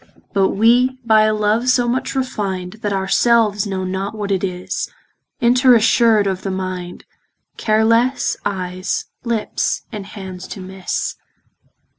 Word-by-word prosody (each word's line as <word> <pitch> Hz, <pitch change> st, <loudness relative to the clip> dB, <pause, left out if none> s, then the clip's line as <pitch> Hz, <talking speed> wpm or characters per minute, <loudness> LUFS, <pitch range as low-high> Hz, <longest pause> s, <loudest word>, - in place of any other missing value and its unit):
But 195 Hz, -2 st, +3 dB
we 245 Hz, +5 st, +3 dB
by 220 Hz, -1 st, +5 dB
a 215 Hz, -, +2 dB
love, 215 Hz, +4 st, +1 dB
so 245 Hz, -1 st, +3 dB
much 255 Hz, +3 st, -1 dB
refin'd, 200 Hz, -7 st, -3 dB
That 205 Hz, -, -1 dB
our 190 Hz, -1 st, -1 dB
selves 220 Hz, -4 st, +3 dB
know 190 Hz, -1 st, -3 dB
not 190 Hz, +3 st, -3 dB
what 205 Hz, -2 st, -3 dB
it 190 Hz, -1 st, 0 dB
is, 180 Hz, -1 st, -3 dB, 0.5 s
Inter 250 Hz, +1 st, +5 dB
assured 225 Hz, -1 st, +4 dB
of 190 Hz, -1 st, -1 dB
the 195 Hz, -, -4 dB
mind, 185 Hz, -2 st, -5 dB, 0.5 s
Care 220 Hz, 0 st, +2 dB
lesse, 235 Hz, +4 st, +2 dB
eyes, 185 Hz, -1 st, -3 dB, 0.2 s
lips, 235 Hz, -3 st, -1 dB
and 205 Hz, -2 st, -6 dB
hands 190 Hz, -3 st, -8 dB
to -, -, -8 dB
misse. 190 Hz, 0 st, -4 dB
205 Hz, 145 wpm, -19 LUFS, 190-230 Hz, 0.5 s, by